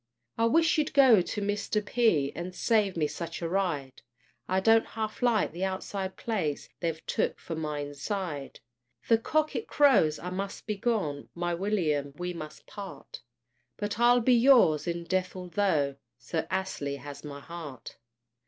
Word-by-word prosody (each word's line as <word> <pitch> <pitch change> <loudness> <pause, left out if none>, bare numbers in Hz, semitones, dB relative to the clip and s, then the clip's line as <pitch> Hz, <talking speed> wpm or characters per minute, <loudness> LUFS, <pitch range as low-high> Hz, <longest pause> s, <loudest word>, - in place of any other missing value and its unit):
I 230 - +2
wish 325 +7 +3
you'd 300 - 0
go 255 -8 +7
to 205 +4 -4
Mr. 205 +1 -1
P. 205 - +2
And 180 +2 -5
save 210 -6 +2
me 155 - +2
such 165 +3 -5
a - - 0
ride; 165 -8 -2 0.5
I 185 +1 +2
don't 225 +3 +5
half 215 -1 -3
like 235 -4 +2
the 175 +3 -5
outside 190 0 -3
place, 180 -11 -2
They've 165 -2 -3
took - - 0
for 165 - -6
my 150 -2 -3
inside. 145 +1 -5 0.5
The 230 -1 +5
cock 310 +6 0
it 445 - -3
crows 215 - +4
I 180 - -6
must 195 +2 -5
be 215 - -2
gone! 195 - -1
My 175 0 -1
William, 165 -7 0
we 180 0 -3
must 155 -3 -9
part! 195 -9 -9 0.6
But 205 +1 -3
I'll 240 +1 +5
be 250 +2 +4
yours 235 - +5
in 170 0 -2
death, 185 +1 -1
altho' 175 -6 0 0.2
Sir 145 +6 -3
Astley 170 -7 -2
has 145 0 -9
my 145 -1 -7
heart. 150 -5 -9
185 Hz, 160 wpm, -29 LUFS, 155-215 Hz, 0.6 s, go